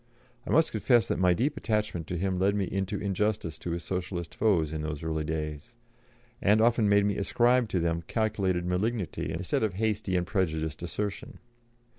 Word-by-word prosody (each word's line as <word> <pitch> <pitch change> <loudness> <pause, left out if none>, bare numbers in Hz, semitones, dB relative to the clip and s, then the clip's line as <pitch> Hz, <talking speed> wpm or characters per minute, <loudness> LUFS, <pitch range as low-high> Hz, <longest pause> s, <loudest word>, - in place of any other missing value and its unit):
I - - -6
must 160 +1 +4
confess 120 +2 +3
that - - -1
my 90 -1 +4
deep 140 - 0
attachment 105 - -1
to 90 - -3
him 95 +1 -1
led 100 +2 +2
me 100 -2 0
into 95 +2 -2
injustice 100 -4 -1
to - - -5
his 85 0 -3
Socialist 90 -2 -4
foes 85 -8 +2
in 80 - -3
those 75 -1 -4
early 80 -1 -1
days, 75 +4 -4 0.7
and 105 +2 +4
often 115 -2 +3
made 100 0 +4
me 100 -1 0
ascribe 120 +3 +2
to 95 - 0
them 85 0 0
calculated 95 -5 0
malignity 90 -2 -1
instead 85 +3 -1
of 105 -5 0
hasty 105 -2 -1
and 90 -1 +1
prejudiced 80 -5 -1
assertion. 105 - -4
95 Hz, 180 wpm, -28 LUFS, 85-110 Hz, 0.7 s, must